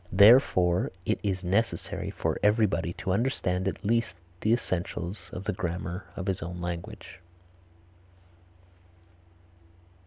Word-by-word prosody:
Therefore, 95 -4 +5
it - - 0
is 95 -2 -2
necessary 100 +6 -1
for - - -2
everybody 105 -5 +2
to 95 - -3
understand 95 -4 0
at 95 - -4
least 115 -3 +1 0.2
the 110 - +1
essentials 95 -3 -2
of 90 - -6
the - - -1
grammar 90 +1 -4
of 95 - -5
his 95 -2 -1
own 90 +1 -5
language. 90 +4 -6
95 Hz, 115 wpm, -28 LUFS, 90-105 Hz, 0.2 s, Therefore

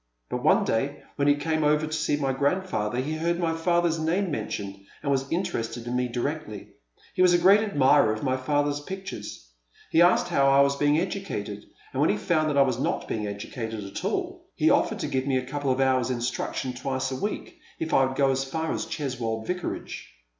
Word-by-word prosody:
But - - -2
one - - +4
day 135 +6 -1
when 140 -1 +1
he 145 - +5
came 155 +1 -1
over 150 +1 +3
to 155 - -6
see 155 -1 +1
my 135 -2 0
grandfather 140 - 0
he 145 +4 -2
heard 170 +2 0
my 170 -2 0
father's 170 0 +1
namie 175 +5 0
men 110 -6 -2
tioned, 100 -1 -6 0.2
and 140 - 0
was 135 0 -1
interested 120 -10 -2
in 120 +1 -3
me 125 0 +1
directly. 120 -3 -4 0.4
He - - 0
was 180 -1 +6
a - - +6
great 190 +4 +6
admirer 145 - +4
of 110 - -4
my 130 -2 +1
father's 145 +2 0
pictures. 185 - -7 0.4
He 165 - +5
asked 175 +1 +5
how 140 0 +3
I 135 0 +6
was 140 0 +3
being 145 +1 +2
educated, 170 - -4 0.3
and - - 0
when - - +4
he 105 - +2
found 155 +7 +1
that 145 - 0
I 140 - +7
was 130 -3 -1
not - - -1
being 105 -2 -2
educated 110 +2 -5
at 100 0 -7
all, - - -3
he - - +3
offered - - +2
to - - -2
give 130 -1 -1
me 135 -2 +2
a 130 - -2
couple 140 +1 -3
of 130 0 +1
hours' 130 -2 +2
instniction 125 +1 -2
twice 130 +1 -2
a - - -2
week 215 - -4 0.2
if 160 - -3
I 135 - +5
would 130 0 -4
go 135 -1 +4
as 135 0 0
far 160 +4 -2
as - - -3
Cheswold 115 -6 -3
Vicarage. 180 - -5
140 Hz, 220 wpm, -26 LUFS, 125-160 Hz, 0.4 s, I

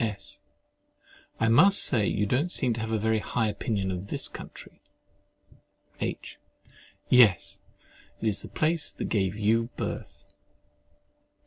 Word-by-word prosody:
S. 100 -2 -5 1.0
I 115 - +2
must 170 - +6
say, 110 -7 +4
you 105 - 0
don't 135 - 0
seem 125 -8 +1
to 115 - -5
have 110 0 -4
a 110 - +1
very 110 +1 +1
high 115 +1 -1
opinion 100 -2 -2
of 90 +1 -5
this - - -4
country. - - -11 1.2
H. - - -5 0.7
Yes, 115 -9 +4 0.6
it 115 - -2
is 105 -2 0
the - - -8
place 160 0 -1
that - - -5
gave 95 -2 0
you 115 +2 +1
birth. - - -6
110 Hz, 135 wpm, -27 LUFS, 105-125 Hz, 1.2 s, must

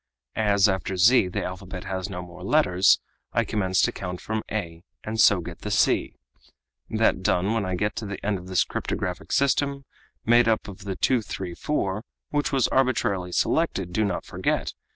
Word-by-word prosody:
As 100 -2 +4
after 95 -1 -2
z 105 +3 +5
the 90 - -3
alphabet 90 0 -6
has 95 -1 -4
no 90 -2 -5
more 90 0 -12
letters, 95 -6 +4 0.3
I - - +2
commence 95 -3 +1
to - - +3
count 90 -2 -6
from 110 0 -3
a, 85 -5 -4 0.2
and 110 0 0
so 100 -3 +5
get - - -8
the - - -5
c. - - +2 0.7
That - - +2
done, 95 +5 +1
when 110 -3 0
I 95 - -1
get 105 +4 -1
to 110 - -4
the 100 -1 -6
end 100 -2 0
of 90 - -12
this 90 -4 +2
cryptographic 90 -1 -4
system, 140 0 +1 0.4
made 120 +1 +5
up 110 -1 +1
of 100 0 -10
the 95 -1 -3
234 100 - -1 0.3
which 145 0 0
was 135 -3 +2
arbitrarily 105 -9 +1
selected, 95 - 0
do 110 - +2
not 100 -4 -2
forget! - - -1
100 Hz, 175 wpm, -25 LUFS, 90-110 Hz, 0.7 s, z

